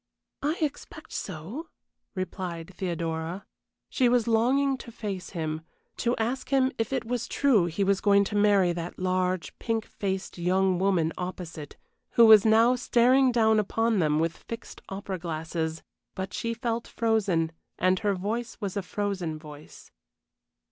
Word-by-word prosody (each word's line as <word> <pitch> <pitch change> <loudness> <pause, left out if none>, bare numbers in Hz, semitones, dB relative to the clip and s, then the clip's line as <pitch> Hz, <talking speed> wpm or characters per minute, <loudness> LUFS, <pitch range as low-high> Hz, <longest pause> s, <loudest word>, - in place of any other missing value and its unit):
"I 300 +4 0
expect 295 -2 -4
so," 195 - -5 0.5
replied 185 -1 -5
Theodora. 170 0 -3 0.4
She 250 -3 +2
was 245 -1 +2
longing 260 +5 +3
to 235 - -9
face 200 -5 -5
him, 155 -1 -2 0.4
to 240 +1 +1
ask 240 +4 -2
him 265 -1 +3
if 225 +1 -1
it 265 - -1
was 240 0 -2
true 235 -11 +3
he 175 +4 -1
was 195 0 +2
going 200 -1 +5
to 205 - -4
marry 200 -4 +4
that 170 0 -5
large, 185 -1 -1
pink 225 -2 -1
faced 190 -2 -4
young 185 +1 +2
woman 185 -4 +2
opposite, 175 -4 -6 0.4
who 235 - +7
was 220 -2 +8
now 225 +3 +5
staring 250 +2 +4
down 220 -2 +4
upon 225 +1 +1
them 150 -3 +2
with 165 +1 0
fixed 230 0 -9
opera 195 -1 -5
glasses; 160 -1 -3 0.3
but 190 0 -4
she 230 0 -2
felt 235 0 -2
frozen, 200 -8 +1 0.3
and 185 +1 +2
her 205 -2 +1
voice 225 +5 -3
was 200 -4 -4
a 200 - 0
frozen 185 -4 -3
voice. 150 -1 -13
200 Hz, 150 wpm, -27 LUFS, 175-230 Hz, 0.5 s, was